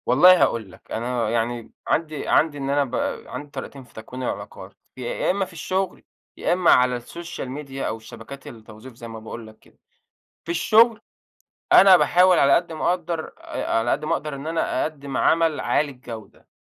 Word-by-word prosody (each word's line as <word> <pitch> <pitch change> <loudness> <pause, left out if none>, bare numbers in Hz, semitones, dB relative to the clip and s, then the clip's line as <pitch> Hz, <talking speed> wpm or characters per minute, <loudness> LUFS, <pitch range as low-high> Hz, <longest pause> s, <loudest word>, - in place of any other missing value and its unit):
والله 180 +8 +7
هاقول 110 -5 +1
لك - - -19
أنا 120 -1 -1
يعني 115 0 -2 0.2
عندي 155 -2 -1
عندي 150 -2 +3
إن 135 -1 -4
أنا 145 +1 +2
ب 125 -1 -6 0.3
عندي 145 - -7
طريقتين 140 -2 -8
في 125 - -22
تكوين 125 +4 -8
العلاقات، - - -6 0.2
يا 125 +6 -1
إمّا 195 +1 -1
في 185 - -15
الشغل، 185 +3 -3 0.3
يا - - +1
إمّا 180 -1 +4
على 125 0 +4
السوشيال 170 +4 -7
ميديا 135 -1 -5
أو 110 - -3
الشبكات 115 +5 -11
التوظيف 110 -1 -12
زي 115 0 -10
ما 115 -1 -8
باقول 110 +1 -9
لك 110 0 -16
كده. - - -25 0.7
في 170 - -3
الشغل: 220 +6 +4 0.7
أنا 190 -2 +9
باحاول 180 0 +4
على 140 0 +5
قدّ 170 -1 0
ما 160 - 0
اقدّر، 170 -2 -2
آآ، - - -3
على 115 - 0
قدّ 150 +2 -1
ما - - 0
اقدر 150 -1 -3
إن 140 +3 -7
أنا 160 -5 -1
أقدّم 140 -3 -4
عمل 165 -2 +2
عالي 145 -1 0
الجودة، 115 -5 -11
140 Hz, 185 wpm, -23 LUFS, 120-165 Hz, 0.7 s, أنا